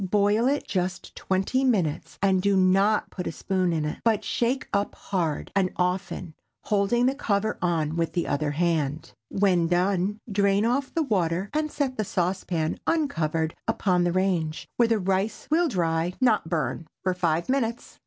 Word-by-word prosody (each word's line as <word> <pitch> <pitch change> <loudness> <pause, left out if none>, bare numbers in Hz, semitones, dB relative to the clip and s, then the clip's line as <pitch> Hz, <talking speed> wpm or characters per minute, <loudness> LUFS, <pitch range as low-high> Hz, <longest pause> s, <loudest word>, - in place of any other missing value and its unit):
Boil 205 +4 +2
it 285 +2 0
just 185 -1 -3
twenty 195 +8 0
minutes, 180 - 0
and 190 -2 +3
do 200 0 +2
not 195 +3 +3
put 180 - -5
a - - -2
spoon 185 +1 -1
in 155 -2 -1
it, 150 - -4
but 220 -2 +2
shake 245 +4 -1
up 200 0 0
hard 170 -6 -2
and 190 -2 +3
often, 180 -2 -2 0.3
holding 215 +4 +2
the 260 - +3
cover 215 -6 -1
on 160 -3 0
with 165 -1 -1
the 175 - 0
other 145 +1 0
hand. 155 -1 -1 0.2
When 185 -4 +2
done, 185 +3 +1
drain 200 +1 +2
off 260 +3 0
the 325 - 0
water, 190 - 0
and 305 0 -1
set 270 -3 -2
the 215 - +1
saucepan 180 -4 -1
uncovered 165 - 0
upon 180 -3 +2
the 175 - +1
range, 175 -4 0
where 235 - +4
the 225 -1 +2
rice 195 +2 -1
will 335 +2 +4
dry, 170 - 0
not 220 -10 +2
burn, 160 -1 -2 0.2
for 185 - +1
five 170 -2 0
minutes. 240 -3 -2
190 Hz, 170 wpm, -26 LUFS, 170-215 Hz, 0.3 s, where